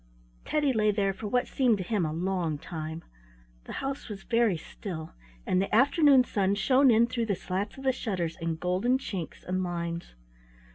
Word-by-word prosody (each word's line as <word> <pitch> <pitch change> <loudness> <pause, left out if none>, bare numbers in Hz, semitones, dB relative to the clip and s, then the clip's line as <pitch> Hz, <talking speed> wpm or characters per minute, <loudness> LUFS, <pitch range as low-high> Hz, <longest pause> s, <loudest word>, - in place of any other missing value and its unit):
Teddy 295 -3 +1
lay 215 -2 +2
there 200 -1 +1
for 210 +2 -6
what 245 +4 +1
seemed 245 -5 +2
to 190 - -3
him 185 -3 0
a - - -3
long 170 -2 -1
time. 160 +1 -6 0.6
The - - -7
house 275 -2 -4
was 200 -2 -7
very 230 -6 +2
still, 160 0 -7 0.3
and 185 - +2
the 195 - -1
afternoon 280 +1 +6
sun 200 -4 0
shone 260 +6 +4
in 230 0 +5
through 235 -1 -2
the 200 - +1
slats 195 +5 -4
of 270 - -9
the 265 - +3
shutters 185 -10 -3
in 165 -2 -2
golden 185 +10 +1
chinks 190 - -6
and 185 +1 -1
lines. 170 - -4
195 Hz, 185 wpm, -28 LUFS, 175-240 Hz, 0.6 s, afternoon